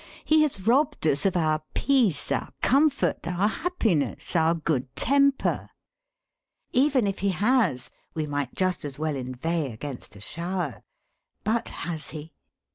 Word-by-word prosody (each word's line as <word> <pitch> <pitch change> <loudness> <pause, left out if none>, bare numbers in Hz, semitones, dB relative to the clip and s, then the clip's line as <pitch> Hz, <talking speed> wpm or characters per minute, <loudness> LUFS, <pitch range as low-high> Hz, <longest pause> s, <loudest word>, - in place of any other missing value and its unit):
He 310 0 +5
has 265 -11 0
robbed 280 - +2
us 150 +4 +3
of 185 -2 0
our 155 -2 +1
peace, 250 - +2
our - - -1
comfort, 280 +2 +3
our 180 +4 +1
happiness, 215 - 0
our 165 0 +4
good 150 -5 -1
temper. 280 0 +2 1.0
Even 265 -2 +3
if 195 -1 -2
he 200 - +1
has, 195 - +1 0.2
we 155 -1 -1
might 145 -3 -3
just 185 -1 0
as 145 -2 -4
well 155 -1 -1
inveigh 135 +4 -2
against 120 -1 -7
a - - -11
shower. 170 - -4 0.6
But 230 +2 0 0.2
has 165 -3 -3
he? 155 0 -8
175 Hz, 140 wpm, -26 LUFS, 150-235 Hz, 1.0 s, He